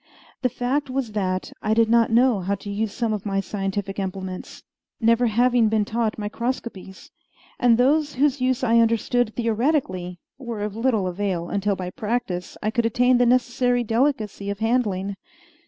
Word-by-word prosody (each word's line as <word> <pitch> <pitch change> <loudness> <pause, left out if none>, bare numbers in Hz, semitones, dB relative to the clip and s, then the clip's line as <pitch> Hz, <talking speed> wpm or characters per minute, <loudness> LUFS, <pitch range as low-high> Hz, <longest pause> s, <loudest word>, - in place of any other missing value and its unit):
The 255 - +2
fact 260 +4 -1
was 255 -3 -2
that 185 -3 -2
I 215 +1 +1
did 230 0 +4
not 230 0 +4
know 235 -1 +4
how 195 +2 -1
to 200 +1 -8
use 210 +1 -2
some 230 -1 -1
of 210 - -3
my 195 -2 -1
scientific 195 0 -3
implements 190 -1 -6 0.4
never 230 +1 +3
having 240 0 +3
been 215 -1 +1
taught 225 0 -1
microscopies 215 -3 -5 0.5
and 235 -2 +4
those 290 +4 +2
whose 275 0 +1
use 255 0 +1
I 230 -1 +4
understood 230 0 +1
theoretically 225 - -1 0.2
were 235 -5 -5
of 210 -1 -4
little 225 -4 +1
avail 180 -2 -2
until 200 0 0
by 180 -1 -5
practice 210 -4 -3
I 215 - 0
could 235 0 +1
attain 245 +2 +3
the 245 - +4
necessary 245 0 +2
delicacy 225 -4 0
of 200 - -3
handling. 205 -4 0
225 Hz, 165 wpm, -23 LUFS, 200-245 Hz, 0.5 s, did